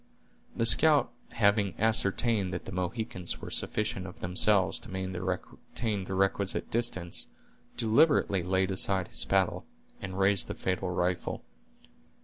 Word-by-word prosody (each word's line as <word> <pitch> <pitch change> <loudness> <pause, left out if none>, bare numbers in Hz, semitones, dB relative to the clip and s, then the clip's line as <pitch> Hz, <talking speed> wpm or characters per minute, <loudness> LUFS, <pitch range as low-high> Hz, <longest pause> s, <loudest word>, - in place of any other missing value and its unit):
The 115 - +1
scout 150 +5 +5 0.2
having 100 -3 +1
ascertained 110 -2 +1
that 85 - -6
the - - -7
Mohicans 90 0 -3
were - - -9
sufficient 105 -3 -2
of 90 - -12
themselves 95 +2 +3
to - - -13
maintain 95 +3 -4
the 95 - -4
requisite 95 0 0
distance, 95 -7 0 0.5
deliberately 115 - +3
laid 95 +2 0
aside 95 -1 +1
his - - +2
paddle, 95 -2 0 0.4
and 95 0 -6
raised 100 0 +2
the - - -6
fatal 95 0 -2
rifle. 90 0 -2
95 Hz, 130 wpm, -29 LUFS, 95-105 Hz, 0.5 s, scout